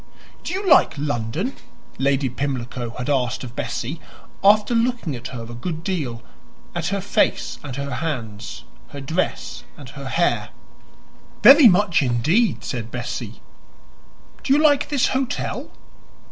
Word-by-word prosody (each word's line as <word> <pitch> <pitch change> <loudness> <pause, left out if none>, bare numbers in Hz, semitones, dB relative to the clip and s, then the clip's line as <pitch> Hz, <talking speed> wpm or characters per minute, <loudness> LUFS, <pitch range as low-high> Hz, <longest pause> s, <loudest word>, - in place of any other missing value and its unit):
"Do - - -4
you 390 +1 -3
like 295 - +5
London?" 145 - -2 0.4
Lady 135 0 +2
Pimlico 125 -2 -3
had 125 - -4
asked 130 -4 0
of 120 -1 -8
Bessie, - - -4 0.4
after 210 +3 +5
looking 235 - 0
at 120 - -7
her 120 -3 -7
a 115 +1 -9
good 160 +7 -5
deal 135 -12 -3 0.5
at 170 -1 -2
her 200 +1 -1
face 200 - 0
and 135 -4 -6
her 140 -1 -4
hands, 115 -9 -5 0.2
her 140 - -9
dress 160 +7 -3
and - - -10
her - - -8
hair. - - +1 0.9
"Very 280 -1 +10
much 195 -4 +4
indeed," 155 - +1
said 120 -3 -4
Bessie. 120 -2 -6 1.0
"Do - - -1
you - - +5
like 295 -2 +3
this 285 -4 +2
hotel?" 260 -1 -2
145 Hz, 140 wpm, -22 LUFS, 125-205 Hz, 1.0 s, Very